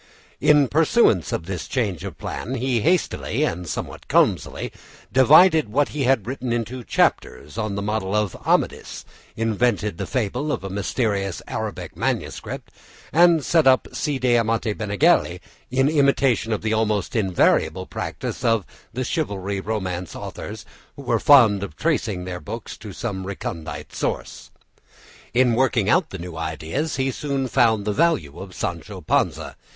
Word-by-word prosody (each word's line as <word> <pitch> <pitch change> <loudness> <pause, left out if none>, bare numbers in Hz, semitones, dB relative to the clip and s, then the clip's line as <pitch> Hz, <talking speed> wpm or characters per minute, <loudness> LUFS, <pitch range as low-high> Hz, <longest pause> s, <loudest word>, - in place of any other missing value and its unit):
In 150 -1 +5
pursuance 150 - +3
of 80 - -3
this 90 -4 -5
change 105 - -2
of - - -7
plan, 130 +5 -5
he 125 -2 0
hastily 175 - 0
and 85 +1 -2
somewhat - - -6
clumsily - - +1 0.4
divided 155 - +6
what 145 +6 +1
he 145 -3 -2
had 130 -5 +2
written 130 0 -4
into 120 +2 -3
chapters 75 - 0
on 110 -3 -2
the 100 - -3
model 105 -1 -1
of 105 -4 0
"Amadis," - - -1 0.3
invented 110 -4 0
the - - -3
fable 130 +4 -1
of - - -3
a 95 - -5
mysterious 100 -1 -1
Arabic - - -5
manuscript, - - -3 0.4
and 170 -2 +5
set 165 -4 +3
up 130 -1 +4
Cide 140 -4 -2
Hamete 115 -3 +2
Benengeli 100 -3 +2 0.3
in 135 +2 +2
imitation 140 -6 +2
of 110 - -1
the 110 0 0
almost 110 -3 0
invariable 95 -3 +2
practice - - -5
of 115 -5 +2 0.3
the 130 +2 -3
chivalry 100 - -2
romance 95 -4 -4
authors, - - -7 0.3
who - - -10
were - - +1
fond 115 -9 +6
of 100 -7 -6
tracing 110 - -1
their 90 -1 -5
books 75 - -7
to - - -9
some 95 -5 -5
recondite 80 -6 -6
source. - - -4 0.9
In 125 -1 +4
working 115 -4 +2
out 180 -1 +3
the 95 - -6
new 85 -2 -8
ideas, 80 - -3
he 135 0 0
soon 135 0 -2
found 115 -5 +2
the 105 - 0
value 115 - +1
of 95 -2 -9
Sancho 85 -2 -5
Panza. - - 0
110 Hz, 150 wpm, -22 LUFS, 95-135 Hz, 0.9 s, divided